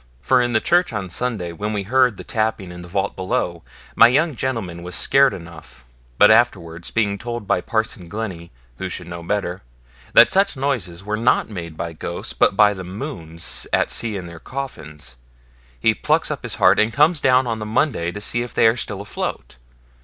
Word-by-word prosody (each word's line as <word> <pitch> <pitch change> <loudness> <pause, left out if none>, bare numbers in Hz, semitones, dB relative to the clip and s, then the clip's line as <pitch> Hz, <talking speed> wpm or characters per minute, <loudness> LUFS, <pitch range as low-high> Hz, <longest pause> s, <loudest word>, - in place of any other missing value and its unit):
For 130 -1 +3
in 120 -1 0
the 110 - +4
church 175 +8 +2
on 95 -5 -4
Sunday, 105 -5 -2
when 105 +6 -4
we 100 -2 -2
heard 125 0 +2
the - - -8
tapping 110 -4 -2
in 90 0 -9
the 90 - -10
vault 95 +2 -2
below, 90 -2 -2 0.3
my 115 - +8
young 150 +4 +2
gentleman 110 -10 -3
was 90 0 -5
scared 135 0 +4
enough; 85 -7 -11 0.3
but 105 - +7
afterwards, 85 -8 +1
being 100 -3 0
told 120 -1 -5
by 90 - +1
Parson 110 -5 -2
Glennie 95 -4 -6 0.3
who 95 - -3
should 90 - -6
know 85 0 -7
better 90 0 -2 0.5
that 115 - +8
such 195 -5 +2
noises 110 -11 -2
were 105 +1 -2
not 115 0 +2
made 85 -5 -7
by 85 -1 -4
ghosts, 85 +2 -5
but 95 - +2
by 105 -1 +6
the 95 -2 -7
Mohunes 80 - -5
at - - +1
sea 115 -3 -1
in 90 - -6
their 85 -1 -10
coffins, 75 - -7 0.6
he - - +3
plucks - - +1
up - - -5
heart, - - +4
and 110 +1 +3
comes 150 +4 +3
down 130 0 +4
on 115 -2 -2
the - - -4
Monday 105 - 0
to 105 - -7
see 120 +3 -1
if 120 -1 -6
they - - +4
are 110 +1 +5
still 100 -4 -4
afloat. 100 -10 -5
105 Hz, 200 wpm, -21 LUFS, 85-120 Hz, 0.6 s, my